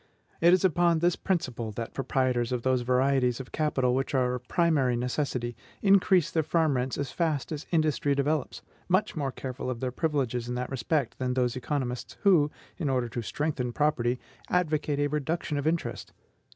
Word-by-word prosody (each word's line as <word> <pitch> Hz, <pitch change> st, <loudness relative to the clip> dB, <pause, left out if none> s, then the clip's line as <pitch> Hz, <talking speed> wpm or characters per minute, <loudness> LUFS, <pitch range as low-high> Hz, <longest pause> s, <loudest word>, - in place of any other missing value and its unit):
It 170 Hz, +1 st, +6 dB
is 185 Hz, +1 st, +4 dB
upon 175 Hz, -1 st, +3 dB
this 175 Hz, +2 st, +2 dB
principle 125 Hz, -, -2 dB
that 115 Hz, +2 st, -5 dB
proprietors 130 Hz, -2 st, 0 dB
of 125 Hz, -2 st, -1 dB
those 130 Hz, -1 st, +2 dB
varieties 125 Hz, 0 st, +2 dB
of 130 Hz, -, -8 dB
capital 135 Hz, -5 st, +1 dB
which 135 Hz, +2 st, -1 dB
are 125 Hz, -1 st, +2 dB
of 125 Hz, 0 st, -6 dB
primary 150 Hz, -8 st, +2 dB
necessity 125 Hz, -1 st, -2 dB, 0.3 s
increase 195 Hz, -4 st, +4 dB
their 160 Hz, -, +2 dB
farm 160 Hz, -2 st, +1 dB
rents 125 Hz, +1 st, -1 dB
as 140 Hz, -3 st, -3 dB
fast 160 Hz, -5 st, -1 dB
as 150 Hz, -1 st, -5 dB
industry 155 Hz, -3 st, +1 dB
develops, 145 Hz, +1 st, -1 dB, 0.3 s
much 185 Hz, +3 st, +2 dB
more 140 Hz, -4 st, -1 dB
careful 130 Hz, 0 st, -5 dB
of 125 Hz, -2 st, -3 dB
their 130 Hz, 0 st, -2 dB
privileges 130 Hz, -5 st, -1 dB
in 125 Hz, -, -2 dB
that 125 Hz, +1 st, -3 dB
respect, 135 Hz, +1 st, -1 dB
than 125 Hz, -1 st, -1 dB
those 125 Hz, -2 st, +1 dB
economists 130 Hz, -2 st, -3 dB
who, 175 Hz, -8 st, +5 dB, 0.3 s
in 155 Hz, -5 st, 0 dB
order 125 Hz, -3 st, 0 dB
to 120 Hz, -, -4 dB
strengthen 130 Hz, 0 st, -2 dB
property, 125 Hz, -3 st, +1 dB, 0.3 s
advocate 155 Hz, -4 st, +1 dB
a 145 Hz, -, +2 dB
reduction 150 Hz, +1 st, -1 dB
of 145 Hz, -, -2 dB
interest. 165 Hz, +1 st, -2 dB
135 Hz, 180 wpm, -28 LUFS, 125-155 Hz, 0.3 s, It